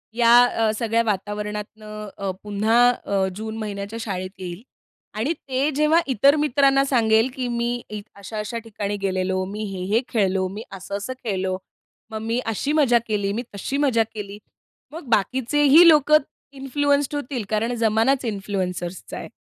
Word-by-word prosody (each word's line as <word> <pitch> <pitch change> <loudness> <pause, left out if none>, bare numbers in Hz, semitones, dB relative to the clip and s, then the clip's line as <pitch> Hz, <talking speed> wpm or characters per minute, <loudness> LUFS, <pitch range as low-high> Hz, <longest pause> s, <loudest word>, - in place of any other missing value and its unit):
या 235 -1 +4
अ, 225 -3 +1
सगळ्या 230 0 +1
वातावरणातनं 210 +1 -4
अ, 195 -1 -2
पुन्हा 210 +3 +1 0.3
अ, 195 -1 +1
जून 220 +1 -5
महिन्याच्या 210 0 -5
शाळेत 185 -4 -4
येईल 180 +1 -6 0.6
आणि 255 +10 0
ते 270 -2 -2
जेव्हा 305 +3 +4
इतर 275 +5 +5
मित्रांना 275 -2 +3
सांगेल 225 -2 +3
की 255 -2 -3
"मी 235 0 -1
इ 210 -1 -5
अशा-अशा 210 +3 -5
ठिकाणी 205 -2 -4
गेलेलो. 185 -1 0
मी 205 +3 -5
हे-हे 190 +5 0
खेळलो, 190 -4 +1
मी 205 +4 -7
असं-असं 200 +5 -5
खेळलो. 190 -3 -1 0.5
मग 220 - -4
मी 230 +2 -1
अशी 225 +6 -1
मजा 265 -6 +4
केली, 205 -2 -1
मी 235 +4 -3
तशी 265 +7 -3
मजा 260 -6 +3
केली." 205 -1 -7 0.5
मग 315 -2 -9
बाकीचेही 270 - +4
लोकं 305 -1 +6 0.4
इन्फ्लुएंस्ड 285 +1 +1
होतील 270 -4 -3
कारण 225 +3 0
जमानाच 225 +5 +2
इन्फ्लुएन्सर्सचा 190 -4 -4
आहे. - - -7
220 Hz, 145 wpm, -23 LUFS, 200-260 Hz, 0.6 s, लोकं